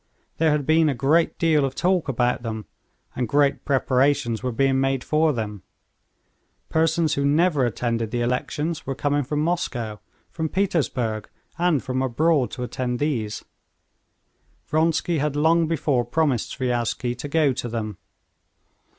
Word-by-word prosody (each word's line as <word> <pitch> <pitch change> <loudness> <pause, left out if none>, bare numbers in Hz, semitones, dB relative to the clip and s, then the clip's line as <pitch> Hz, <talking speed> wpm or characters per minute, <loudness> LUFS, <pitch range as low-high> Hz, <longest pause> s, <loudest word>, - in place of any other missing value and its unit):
There 160 0 +4
had 150 -2 +1
been 160 +1 +4
a 140 - -1
great 155 +6 +2
deal 160 -3 +3
of 135 -1 -2
talk 180 -4 +1
about 125 -1 +1
them, 110 -3 -5 0.5
and 125 -1 -1
great 145 -1 +2
preparations 130 -3 +1
were 125 0 -2
being 135 +2 +2
made 135 -1 0
for 155 +1 +2
them. 105 -6 -4 1.1
Persons 160 -1 +2
who 140 - 0
never 145 -2 +3
attended 115 0 -2
the 120 +2 -2
elections 150 +6 -2
were 135 - -2
coming 145 +1 0
from 150 +3 -1
Moscow, 120 -11 -2 0.3
from 160 -1 -3
Petersburg, 135 - -1 0.3
and 170 -6 +2
from 130 0 -2
abroad 135 0 +2
to 125 - -6
attend 125 +1 -3
these. 120 -7 -2 1.2
Vronsky 160 +1 +1
had 145 0 -1
long 160 +2 +3
before 145 -6 +1
promised 130 -1 0
Sviazhsky 120 -1 -1
to - - -4
go 145 -2 +2
to 120 - -4
them. 110 -4 -4
140 Hz, 145 wpm, -23 LUFS, 120-155 Hz, 1.2 s, There